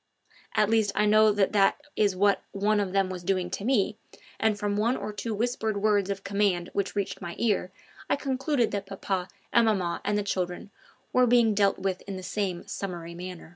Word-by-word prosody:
At 210 - +4
least, 220 -3 +3
I 210 +1 +3
know 215 +1 +5
that 200 -2 +2
that 200 +4 +3 0.2
is 205 -3 +2
what 200 +1 +3
one 205 +1 +2
of 200 -2 -1
them 195 0 +2
was 180 -1 -5
doing 185 -1 0
to 195 - -4
me, 215 -4 +1 0.4
and 220 -2 +2
from 205 0 -1
one 230 +5 +1
or 210 - -5
two 225 +2 -4
whispered 220 -1 -1
words 205 -2 +2
of 195 -1 -3
command 200 -3 0
which 200 0 -2
reached 200 -1 -2
my 170 0 -6
ear 205 -5 0 0.4
I - - +3
concluded 270 -2 0
that 200 -1 -3
papa 195 -2 -3 0.3
and 235 -1 +5
maman 185 -5 0
and 205 0 0
the 205 - 0
children 185 0 -3 0.4
were 255 0 +5
being 235 -2 +4
dealt 200 -1 +2
with 190 -1 -2
in 195 - -4
the 185 - -7
same 185 -2 -3
summary 170 -3 -5
way. 180 -1 -8
200 Hz, 205 wpm, -27 LUFS, 190-215 Hz, 0.4 s, know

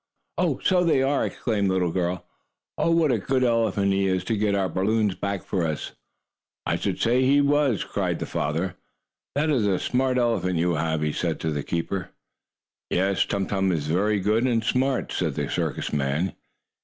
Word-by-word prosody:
"Oh, - - +1
so 180 -2 +3
they 155 -6 +3
are!" 140 +1 +1
exclaimed 105 -5 -1
the - - +1
little 90 -2 +1
girl. 90 0 -2 0.5
"Oh, - - +1
what 165 -3 +3
a 115 - +1
good 130 +5 0
elephant 115 -5 +2
he 95 0 +1
is 95 -1 0
to 115 - -1
get 105 -1 +1
our 95 -1 +1
balloons 105 +3 +1
back 100 0 -3
for 95 -3 -1
us!" 80 -3 -3 0.7
"I - - +1
should - - -2
say 120 +3 +3
he 140 +2 +4
was!" 145 -5 +2
cried - - -2
the - - -4
papa. 80 +5 -2 0.6
"That 150 +2 +1
is 120 -8 +2
a 95 -2 +2
smart 130 +4 0
elephant 115 -7 +1
you 85 +1 +1
have," 80 -1 -1
he 75 -1 0
said 85 -3 -2
to 80 - -1
the 75 -1 -2
keeper. 85 +4 -3 0.8
"Yes, 95 +2 +1
Tum 100 -1 -1
Tum 95 -1 0
is 80 -4 -1
very 100 +7 +1
good 105 +5 +1
and 115 -3 +1
smart," 130 +3 0
said - - -1
the - - -2
circus - - -2
man. 75 +6 0
100 Hz, 195 wpm, -25 LUFS, 90-125 Hz, 0.8 s, he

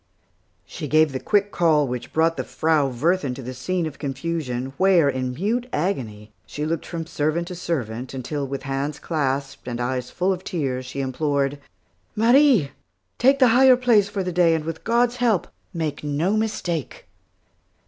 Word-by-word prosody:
She - - -6
gave 155 -1 +4
the 130 - -3
quick 205 +4 +1
call 155 -4 +3
which 125 -1 -5
brought 165 +1 +2
the - - -3
Frau 155 -3 +1
Wirthin 140 +1 0
to 135 - -8
the 130 +2 -6
scene 175 +7 -2
of 150 -3 -7
confusion, 135 -3 -3
where 185 -5 +4
in 130 -2 -2
mute 230 - -1
agony, 115 - -3 0.2
she 150 - -4
looked 160 0 -3
from 165 -2 -4
servant 160 +2 -1
to 180 - -6
servant, 125 -8 -3
until, 140 +2 -3
with 140 0 -5
hands 135 +2 -3
clasped, 140 -5 -2
and 120 -1 -4
eyes 125 0 -2
full 185 +2 0
of 185 0 -7
tears, 130 -8 -3
she 135 +2 -4
implored, 140 +1 -1 0.6
"Marie, 235 - +4 0.5
take 270 +3 +5
the 255 -3 +5
higher 255 +2 +6
place 230 -5 +3
for 200 -1 -2
the 180 - -3
day, 170 -2 +4
and 155 -1 -3
with 165 0 -5
God's 240 +1 +2
help, 230 -7 +1 0.2
make 160 -6 -3
no 150 +8 0
mistake." 175 - -3
155 Hz, 170 wpm, -23 LUFS, 135-185 Hz, 0.6 s, higher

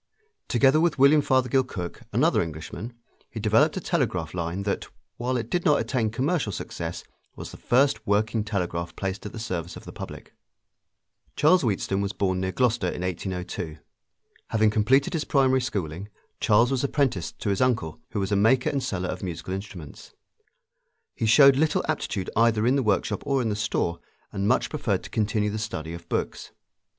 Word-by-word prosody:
Together 135 +5 +4
with 170 -3 +2
William 140 +3 +6
Fothergill 130 -1 +2
Cooke, 90 -9 -6
another - - +3
Englishman, 80 +8 -6 0.4
he 115 - -7
developed 115 - +3
a - - 0
telegraph 120 - -1
line 90 +2 -3
that, 100 0 -2 0.3
while 125 +1 -1
it 115 -2 -3
did 175 +7 -1
not 150 -1 +4
attain 115 -5 0
commercial 135 +2 0
success, 85 -2 -5 0.3
was - - -8
the - - -11
first 125 -4 +2
working 105 +2 +1
telegraph 90 -5 -3
placed 95 +1 -4
at - - -8
the - - -9
service 90 -6 -4
of - - -11
the - - -8
public. - - -9 1.0
Charles 170 +5 +5
Wheatstone 100 -3 0
was 100 +1 -2
born 95 -2 0
near 95 0 -1
Gloucester 120 -3 +1
in 90 - -3
1802. 90 -3 -4 0.7
Having 110 -1 +2
completed 130 - +3
his 160 -3 0
primary 130 -2 +3
schooling, 100 -5 -4 0.3
Charles 115 +3 +4
was 135 -1 0
apprenticed 135 - 0
to - - -3
his 100 - 0
uncle, 115 -11 0
who 110 - -3
was 95 +1 -2
a - - +3
maker 115 +6 +3
and 140 - -1
seller 95 -6 -2
of 90 - -4
musical 90 0 -5
instruments. 95 -6 -8 1.0
He 110 - -1
showed 135 +4 +7
little 155 +1 +1
aptitude 105 -11 -2
either 115 -1 +3
in 125 +3 +3
the 140 - +2
workshop 105 -5 0
or 140 -1 +2
in 120 -3 0
the 105 - -1
store, 105 -5 -1 0.3
and 100 +1 -1
much - - +2
preferred - - -1
to - - -10
continue 105 -1 0
the 110 - -3
study 85 -7 -4
of 85 0 -10
books. - - -3
110 Hz, 180 wpm, -25 LUFS, 95-130 Hz, 1.0 s, showed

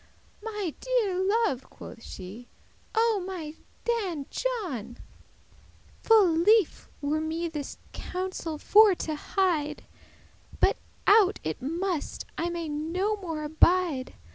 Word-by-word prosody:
"My 415 -7 -3
deare 430 -7 +1
love," 400 - +1
quoth 230 - -11
she, 205 +4 -9 0.5
"O 445 -4 +3
my 350 -5 -5 0.3
Dan 390 -12 -1
John, 335 - -3 1.0
Full 430 -6 +6
lief* 415 +2 +3
were 300 +2 0
me 325 +2 -2
this 300 -4 -6 0.2
counsel 365 -4 -4
for 415 +4 +6
to 315 - -3
hide, 305 -2 0
*pleasant - - -24
But - - +3 0.3
out 410 -2 +5
it 155 0 -3
must, 335 +4 -2
I 340 - -1
may 340 -1 -3
no 330 +8 -1
more 325 -6 -4
abide. 315 -2 +2
345 Hz, 115 wpm, -28 LUFS, 300-405 Hz, 1.0 s, Full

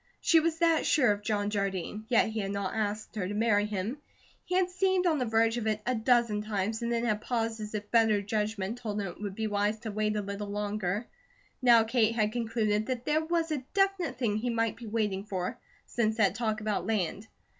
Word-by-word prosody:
She 330 - +5
was 325 0 0
that 330 -1 +3
sure 255 -8 +4
of 205 0 -2
John 205 -1 -1
Jardine; 200 +1 -2
yet 235 -2 +3
he 220 0 -3
had 195 -2 -2
not 200 -1 -2
asked 215 0 -3
her 190 -4 -2
to 205 - -4
marry 210 -1 +2
him. 210 +7 -3 0.4
He 360 - -3
had 365 -1 +2
seemed 375 0 +1
on 320 -4 +2
the 250 - 0
verge 225 +1 +2
of 225 -2 -2
it 215 -1 +1
a 255 - +1
dozen 235 -2 +2
times, 215 +1 -2
and 235 0 -1
then 235 0 0
had 215 -2 0
paused 225 -2 -2
as 215 0 -5
if 210 0 -5
better 225 -3 +4
judgment 210 +1 -2
told 210 -3 -3
him 200 - -2
it 175 +2 -8
would 200 -2 -4
be 220 - -2
wise 205 0 0
to 220 -2 -4
wait 215 0 0
a 210 - 0
little 200 +1 -5
longer. 205 0 -2 0.6
Now 235 -3 +6
Kate 230 0 +2
had 215 -2 +1
concluded 220 -2 0
that 255 -2 -3
there 310 +1 +2
was 330 0 0
a 290 -4 -2
definite 390 -3 +1
thing 220 -5 0
he 240 +3 -2
might 230 -1 0
be 235 - -10
waiting 210 -3 -1
for, 200 +3 -4 0.3
since 220 -2 0
that 200 -4 +3
talk 220 -1 -1
about 205 -4 -1
land. 210 0 -1
220 Hz, 225 wpm, -29 LUFS, 205-240 Hz, 0.6 s, Now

